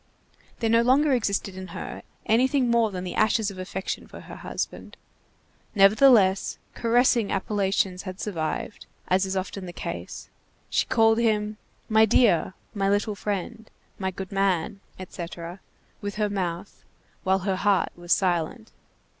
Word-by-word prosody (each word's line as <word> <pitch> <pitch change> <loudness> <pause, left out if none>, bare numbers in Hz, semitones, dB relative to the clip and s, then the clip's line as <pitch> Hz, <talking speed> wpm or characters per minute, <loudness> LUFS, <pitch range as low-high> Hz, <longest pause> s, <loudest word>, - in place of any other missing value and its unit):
There 225 - +1
no 230 0 +5
longer 270 +4 +4
existed 200 -5 -1
in 190 0 -7
her - - -6 0.2
anything 255 +2 +3
more 230 -2 +3
than 185 -2 -5
the 180 - -5
ashes 215 -1 +2
of 190 - -10
affection 185 +1 -4
for - - -11
her - - -10
husband. - - -5 0.8
Nevertheless, 200 -1 +5 0.2
caressing 235 -1 +2
appellations 195 -2 0
had 185 -1 -8
survived, 175 +1 -4 0.2
as 190 +1 +2
is 190 0 -2
often 190 0 -4
the - - -6
case. - - -6 0.4
She - - +1
called 225 -1 +4
him: 215 -2 +1 0.3
My 220 0 +5
dear, 195 -5 +3 0.2
my 195 -2 0
little 205 +1 +1
friend, 210 +2 -4 0.3
my 190 -1 -1
good 190 0 -7
man, 195 -1 0 0.2
etc., 175 -1 -7 0.4
with 205 0 -4
her 210 -1 0
mouth 180 -1 -4 0.4
while 190 +1 +2
her 190 -2 0
heart 200 -1 +2
was 175 0 -8
silent. 185 +6 0
200 Hz, 145 wpm, -25 LUFS, 185-220 Hz, 0.8 s, no